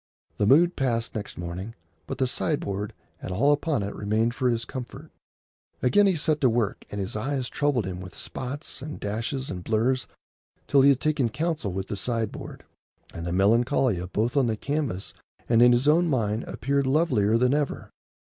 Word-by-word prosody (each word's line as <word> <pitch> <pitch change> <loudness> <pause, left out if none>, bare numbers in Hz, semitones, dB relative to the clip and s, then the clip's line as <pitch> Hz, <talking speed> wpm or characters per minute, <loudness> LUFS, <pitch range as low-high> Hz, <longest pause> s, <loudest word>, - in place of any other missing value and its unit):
The 100 - +2
mood 170 +8 +5
passed 115 -3 -1
next 105 -1 -6
morning, 90 +6 -6 0.3
but - - -4
the 130 - +2
sideboard 105 - -2 0.3
and - - -5
all 130 +11 +3
upon 145 -5 0
it 100 - -4
remained 110 +3 0
for 125 -1 +1
his 115 -1 -1
comfort. 125 -2 -8 0.7
Again 200 +11 +5
he 190 - +3
set 155 0 +1
to 130 - +5
work, 115 -3 -1
and 100 - -5
his 95 +1 -3
eyes 130 +2 -2
troubled 145 -7 0
him 90 -1 -5
with 90 -1 -10
spots 140 +2 -4
and 150 +2 -7
dashes 115 +6 -3
and 90 -1 -6
blurs 115 +5 +1 0.6
till 140 - +4
he 140 - +7
had 135 -2 +3
taken 150 -6 +1
counsel 155 - -2
with 95 +1 -3
the - - -3
sideboard, 115 +1 -4 0.5
and 85 +1 -5
the - - -2
Melancolia 110 - +2
both 115 +7 0
on 135 -3 +3
the 110 -2 -1
canvas 140 -8 -2 0.3
and 115 -1 +4
in 120 0 +8
his 120 +3 +2
own 170 +4 +4
mind 110 -4 0
appeared 140 0 -1
lovelier 130 -8 +3
than 125 +2 +3
ever. 145 -1 -2
120 Hz, 185 wpm, -26 LUFS, 105-140 Hz, 0.7 s, in